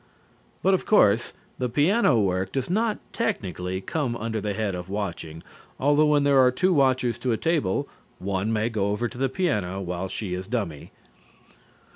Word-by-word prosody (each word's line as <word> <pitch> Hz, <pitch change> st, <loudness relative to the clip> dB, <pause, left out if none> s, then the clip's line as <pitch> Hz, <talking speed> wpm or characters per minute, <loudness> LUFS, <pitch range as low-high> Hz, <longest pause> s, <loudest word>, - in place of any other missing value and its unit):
But, 195 Hz, -, +4 dB
of 190 Hz, -, 0 dB
course, 115 Hz, -, +4 dB, 0.3 s
the 125 Hz, -1 st, -1 dB
piano 150 Hz, -, +3 dB
work 95 Hz, -1 st, 0 dB
does 135 Hz, +5 st, -2 dB
not 220 Hz, +2 st, +1 dB, 0.2 s
technically 95 Hz, -, -2 dB
come 140 Hz, -, -2 dB
under 110 Hz, 0 st, -3 dB
the 105 Hz, -1 st, -2 dB
head 105 Hz, -2 st, -1 dB
of 90 Hz, +1 st, -6 dB
watching, 85 Hz, -5 st, -5 dB, 0.4 s
although 145 Hz, +2 st, +4 dB
when 145 Hz, -1 st, +3 dB
there 140 Hz, -1 st, +4 dB
are 130 Hz, -1 st, +6 dB
two 185 Hz, +9 st, +1 dB
watchers 130 Hz, -5 st, +2 dB
to 125 Hz, -1 st, 0 dB
a -, -, 0 dB
table, 115 Hz, -, 0 dB, 0.3 s
one 100 Hz, +3 st, -2 dB
may 110 Hz, 0 st, +1 dB
go 105 Hz, -4 st, -1 dB
over 105 Hz, +4 st, -1 dB
to 120 Hz, -, -11 dB
the 135 Hz, 0 st, +1 dB
piano 105 Hz, -, -1 dB
while 90 Hz, 0 st, -3 dB
she 95 Hz, -1 st, -4 dB
is 90 Hz, +1 st, -4 dB
dummy. 100 Hz, -, -3 dB
115 Hz, 175 wpm, -25 LUFS, 95-140 Hz, 0.4 s, are